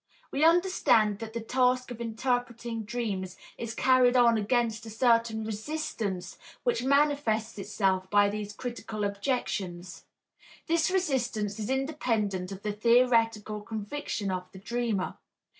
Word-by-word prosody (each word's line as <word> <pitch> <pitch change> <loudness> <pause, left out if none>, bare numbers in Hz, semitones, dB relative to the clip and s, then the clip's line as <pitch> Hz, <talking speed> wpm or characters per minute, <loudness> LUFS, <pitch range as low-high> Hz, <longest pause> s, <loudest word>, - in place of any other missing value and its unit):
We 280 - 0
understand 320 - +4
that 225 -1 -7
the 230 - -3
task 250 +2 +1
of 240 -1 -7
interpreting 235 -1 -2
dreams 205 -5 -3 0.2
is 230 0 -5
carried 255 -1 +4
on 235 -1 +6
against 230 +1 0
a - - -6
certain 230 -1 +2
resistance 215 - -4 0.2
which 485 - +1
manifests 265 -6 +1
itself 190 -2 0
by 205 0 +5
these 205 0 -4
critical 225 -1 -5
objections. 200 -5 -3 0.6
This 335 +1 +2
resistance 240 - -1
is 215 - -3
independent 230 -9 -1
of 195 0 -8
the 210 -1 -1
theoretical 225 -2 +2
conviction 210 -1 -4
of 185 0 -4
the - - -12
dreamer. 225 -1 -2
225 Hz, 125 wpm, -28 LUFS, 205-250 Hz, 0.6 s, on